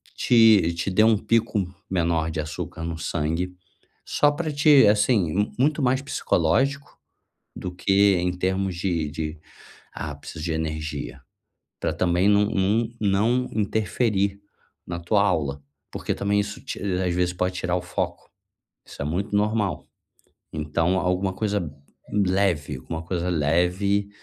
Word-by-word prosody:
te 110 -8 +5
te 85 +3 -2
dê 110 +4 +4
um 110 -1 +5
pico 115 0 +1 0.3
menor 85 -3 0
de 80 - -4
açúcar 80 +1 -5
no 85 -1 -4
sangue, 85 +3 -2 0.5
só 145 - +3
para 155 +1 -3
te 145 -3 +6
assim, 105 -4 +3
m 105 +5 0
muito 150 +3 +2
mais 130 +1 +2
psicológico 140 - 0 0.6
do 90 -1 -6
que 100 +2 +3
em 90 +1 0
termos 95 0 -1
de 85 -4 -1
de 80 -1 -5 0.5
ápices 80 - -7
de 80 0 -1
energia 80 -2 -4 0.6
pra - - 0
também 90 +2 +2
não 105 0 +4
não 105 +4 +1
não 110 +5 +2
interferir 105 -1 0 0.5
na 85 -1 -4
tua 100 +4 +2
aula, 70 -7 0 0.3
porque - - -3
também 100 0 +1
isso 100 0 -5
ti - - -6
às 90 -2 0
vezes 90 0 +1
pode 90 +1 -1
tirar 90 0 -1
o 90 - -3
foco. 90 - -4 0.6
Isso - - -10
é - - -2
muito 95 +7 -2
normal, 105 -1 0 0.7
então 80 +4 0
alguma 90 +1 0
coisa 105 +1 -1 0.5
leve, 95 -8 +1
alguma 80 +6 -6
coisa 90 +1 -2
leve, 90 +6 +1
95 Hz, 140 wpm, -24 LUFS, 85-105 Hz, 0.7 s, te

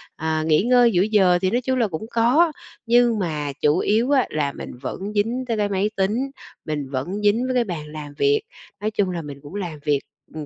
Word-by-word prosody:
à, 160 0 -1
nghỉ 155 +2 +3
ngơi 245 0 +5
giữa 180 -3 +3
giờ 190 -4 +4
thì 185 - +2
nói 245 +3 +1
chung 260 +1 -1
là 230 - +3
cũng 175 +2 -5
có, 255 +9 +4 0.3
nhưng 235 -1 +4
mà 150 -6 -2
chủ 150 +2 +3
yếu 225 +8 +1
á, 270 -3 +4
là 145 -2 -1
mình - - -8
vẫn 195 +9 -5
dính 230 +5 0
tới 230 -2 -1
cái 205 -1 0
máy 200 +1 0
tính, 220 +8 0 0.3
mình 150 -3 -3
vẫn 160 +10 -3
dính 210 +4 +2
với 255 - -1
cái 245 - +3
bàn 175 -8 -5
làm 150 -1 -8
việc. 425 0 +3 0.4
Nói 215 +1 -1
chung 205 -3 0
là 175 -2 -3
mình 145 -2 -9
cũng 145 +6 -11
làm 175 -7 -4
việc, 145 -2 +2 0.3
ừm, 155 -1 -6
200 Hz, 230 wpm, -22 LUFS, 155-235 Hz, 0.4 s, ngơi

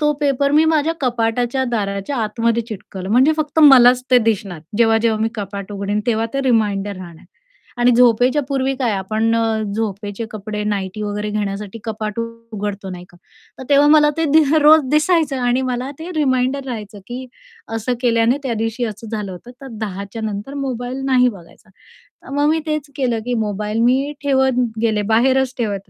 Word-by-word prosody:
तो 300 0 +3
पेपर 280 -1 +1
मी 310 +2 +5
माझ्या 320 0 +2
कपाटाच्या 245 +1 0
दाराच्या 200 +3 -2
आतमध्ये 230 +1 0
चिटकवलं 190 -3 -7
म्हणजे 260 +7 +5
फक्त 310 0 -2
मलाच 255 -4 +7
ते 250 - +7
दिसणार, 205 -7 -1 0.2
जेव्हा-जेव्हा 225 -1 +3
मी 225 - +1
कपाट 200 -1 -6
उघडीन, 200 +1 -2
तेव्हा 225 -1 +1
ते 275 - +1
रिमाइंडर 205 -5 +1
राहणार. 170 -3 -11 0.5
आणि 240 +1 +4
झोपेच्या 245 +3 +4
पूर्वी 270 -1 0
काय 240 -5 0
आपण 215 +4 0
अ, 225 -1 0
झोपेचे 205 0 -4
कपडे 210 0 -5
नाईटी 205 0 -3
वगैरे 210 0 -3
घेण्यासाठी 205 +1 -4
कपाट 215 -1 -4
उ - - -1 0.3
उघडतो, 200 -2 -4
नाही 180 -1 -8
का? 175 - -20 0.4
तर - - -7
तेव्हा 285 +1 +5
मला 300 -1 +5
ते 325 - 0
दि 315 0 +7
अ, - - +5
रोज 310 +1 +7
दिसायचं 305 -1 +2
आणि 245 +1 +1
मला 250 +2 -3
ते 330 +3 -7
रिमाइंडर 265 -1 +1
राहायचं, 215 -5 -6
की 255 +2 -6 0.5
असं 225 +3 -2
केल्याने 235 +1 +2
त्या 255 -4 -2
दिवशी 225 +2 -2
असं 220 0 -6
झालं 210 -4 -4
होतं. 185 +7 -11
तर 270 - -9
10:00च्या 200 +1 -5
नंतर 210 +5 -5
मोबाईल 260 -1 -4
नाही 255 -2 +4
बघायचा. 195 -1 -12 0.3
तर - - -19
मग 290 +1 +2
मी 320 +1 +2
तेच 305 -2 -3
केलं, 245 -4 0
की 245 - -2
मोबाईल 210 +1 -3
मी 265 +5 +2
ठेवत 265 -2 +2 0.2
गेले, 220 -2 +1
बाहेरच 260 +2 +2
ठेवत 200 -5 -3
230 Hz, 175 wpm, -19 LUFS, 210-265 Hz, 0.5 s, मलाच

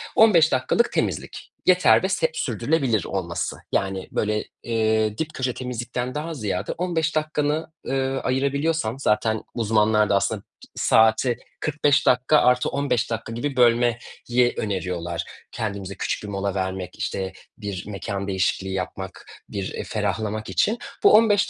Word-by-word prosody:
15 175 -8 +6
dakikalık 180 - +2
temizlik, - - -3
yeter 180 0 +5
ve 190 - +1
seb - - +1
sürdürülebilir 135 - 0
olması. 85 -3 -3
Yani 95 -1 -1
böyle, 105 0 0 0.2
eee, 110 -2 +1
dip 160 0 -3
köşe 130 -1 -1
temizlikten 125 +1 -4
daha 160 +2 -3
ziyade 105 -7 -2
15 165 -3 -1
dakikanı, 155 0 0 0.2
ııı, 135 0 0
ayırabiliyorsan 140 0 0
zaten 110 -3 +1
uzmanlar 105 -2 +2
da 100 - +3
aslında 105 +1 0
bi - - -36 0.3
saati 110 +2 +3 0.2
45 145 -1 +2
dakika 130 +5 +4
artı 125 0 +3
15 140 -5 0
dakika 115 0 -3
gibi 135 +3 -3
bölmeyi 120 -1 +4 0.6
öneriyorlar. 90 -4 -2 0.3
Kendimize 100 -3 -4
küçük - - -2
bir - - -6
mola 100 -1 -2
vermek, 95 -1 -3
işte, 95 -1 -3 0.2
bir 100 -4 -5
mekân 100 0 -4
değişikliği 95 0 0
yapmak, 95 -1 -5 0.2
bir, 100 -2 -4
eee, - - -4
ferahlamak 105 +1 -2
için. 225 +3 +2 0.3
Bu - - +7
15 210 -2 +5
115 Hz, 140 wpm, -24 LUFS, 100-140 Hz, 0.6 s, Bu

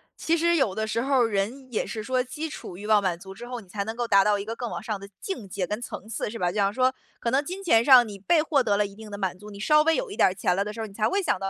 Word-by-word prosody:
其 335 +1 0
实 340 +1 +3
有 265 - +2
的 220 +1 -2
时 230 +2 -1
候 265 -1 +3
儿 - - +2
人 230 +6 -3
也 215 - -1
是 220 -2 -5
说 255 +2 +1
基 305 +5 -5
础 180 - -8
欲 210 +2 -7
望 215 -1 +5
满 185 -3 0
足 190 0 -10
之 240 +4 -10
后， 245 -1 -5
你 195 - -18
才 200 +2 -3
能 220 +2 -5
够 240 -1 -2
达 200 -2 +5
到 210 -1 +3
一 200 - -5
个 225 - -4
更 240 -1 -4
往 170 -1 -5
上 215 -2 -4
的 200 - -9
境 245 - -5
界 185 0 -3
跟 210 +5 -3
层 220 - -7
次， 225 - -3
是 230 - -6
吧。 180 - +1
就 - - -10
比 210 - 0
方 200 +1 +2
说， 255 +1 +2 0.3
可 235 - -1
能 275 +3 +2
金 370 +6 -6
钱 230 -11 +4
上 250 -3 +8
你 205 - -8
被 315 - +3
获 300 -4 +2
得 205 -3 +2
了 210 - +2
一 200 0 -9
定 220 -1 -11
的 205 - -5
满 190 -2 -2
足， 210 +2 -12
你 200 -1 -10
稍 300 +7 +4
微 325 0 +3
有 - - -2
一 - - -7
点 - - +6
儿 185 - -4
钱 180 - 0
了 195 - +1
的 210 +1 -6
时 230 - -9
候 225 - -2
儿， - - -7
你 195 - -14
才 215 +1 +1
会 395 +1 +1
想 275 - 0
到 195 0 -2
220 Hz, 390 characters per minute, -26 LUFS, 200-260 Hz, 0.3 s, 上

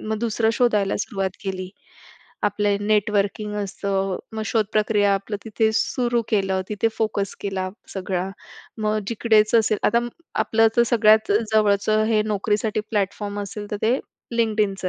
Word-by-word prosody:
मग 220 0 -3
दुसरं 225 0 +1
शोधायला 210 -5 +2
सुरुवात 195 -2 -2
केली. 185 -2 -4 0.8
आपलं 205 0 0
नेटवर्किंग 210 0 +1
असतं, 195 -1 -2 0.2
मग 220 - -3
शोधप्रक्रिया 210 -1 +2
आपलं 195 +2 -3
तिथे 220 0 +1
सुरू 240 +1 +1
केलं, 195 -3 +1
तिथे 210 +2 0
फोकस 210 -3 -1
केला 190 -2 -2 0.3
सगळा. 185 -1 -2 0.5
मग 215 0 0
जिकडेच 220 -1 +3
असेल, 220 -2 +3
आता 235 - +3 0.4
आपलं 225 0 +3
तर 235 - +6
सगळ्यात 220 -2 +4 0.2
जवळचं 215 0 +3
हे 215 -1 +2
नोकरीसाठी 210 +1 0
प्लॅटफॉर्म 205 0 -2
असेल, 205 +1 -6
तर 210 - -2
ते 240 +4 +3 0.4
LinkedInचं 210 -4 +1
210 Hz, 135 wpm, -23 LUFS, 200-220 Hz, 0.8 s, तर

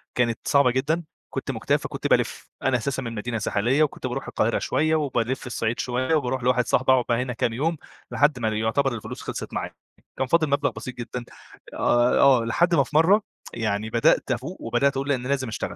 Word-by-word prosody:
كانت 120 -2 +1
صعبة 140 -3 +4
جدًا 150 +7 0 0.3
كنت - - -4
مُكتئب - - 0
فكنت - - -4
بالِف، - - 0
أنا 130 -2 +2
أساسًا 135 +3 -3
من 115 -3 -5
مدينة 115 +2 -3
ساحلية 120 +9 +1
وكنت 150 - -2
باروح - - -4
القاهرة - - 0
شوية، 155 +1 +1
وبالِف 130 -4 -1
الصعيد 115 -1 -2
شوية، 130 +5 0
وباروح 130 -3 -1
لواحد 125 0 +2
صحبي 130 +1 +3
اقعد 130 -1 +4
بقى 120 0 +2
هنا 125 -1 -3
كام 115 0 -1
يوم 160 +7 -1 0.3
لحد 145 -3 +2
ما 110 - -1
ل 110 - 0
يُعتبر 110 +5 0
الفلوس 110 - -7
خلصت - - -6
معايا، - - -4 0.4
كان 130 - -1
فاضل 160 +1 +2
مبلغ 140 0 +1
بسيط 130 - -8
جدًا 120 0 -6 0.5
آه 120 +1 +2
ي - - +2
آه 130 -4 +5
لحد 170 +9 +2
ما 140 - +4
في - - -11
مرّة 185 +7 +5 0.3
يعني 110 -1 -2
بدأت 115 +3 +2
افوق 130 +9 -3
وبدأت 120 +4 +1
اقول 140 +1 -3
لا 140 - +3
أنا 125 0 -6
لازم 135 -2 0
اشتغل. 110 - -4
130 Hz, 210 wpm, -24 LUFS, 120-140 Hz, 0.5 s, آه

